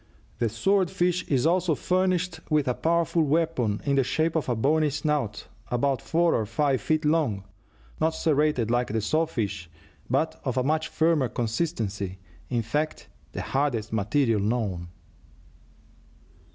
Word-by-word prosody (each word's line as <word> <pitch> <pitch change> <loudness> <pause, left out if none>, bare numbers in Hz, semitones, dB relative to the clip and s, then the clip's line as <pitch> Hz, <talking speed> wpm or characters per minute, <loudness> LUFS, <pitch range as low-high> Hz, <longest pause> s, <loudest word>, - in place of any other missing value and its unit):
The 115 - +1
sword 185 - +2
fish 180 -1 0
is 135 -1 +1
also 170 -1 +2
furnished 180 0 0
with 150 -3 +2
a 125 - +2
powerful 170 +3 +1
weapon 150 -8 +1
in 140 -1 +2
the 135 - +4
shape 160 +6 0
of 150 -5 0
a 120 - +1
bony 150 +6 +2
snout 145 -7 -2 0.2
about 130 +1 0
four 170 +1 +2
or 110 -2 0
five 135 +4 +1
feet 155 0 0
long, 150 -11 +1 0.6
not 160 0 +1
serrated 150 -8 +1
like 120 0 +1
the 110 - -1
saw 160 +9 +1
fish, 100 - -3 0.4
but - - 0
of 130 0 -2
a 130 - +2
much 155 +3 0
firmer 155 -5 +2
consistency 110 - -2 0.3
in 120 -2 0
fact, 150 +8 -2 0.2
the - - -4
hardest 125 -6 -1
material 110 +2 +1
known. 100 -5 -1
140 Hz, 150 wpm, -26 LUFS, 115-160 Hz, 0.6 s, the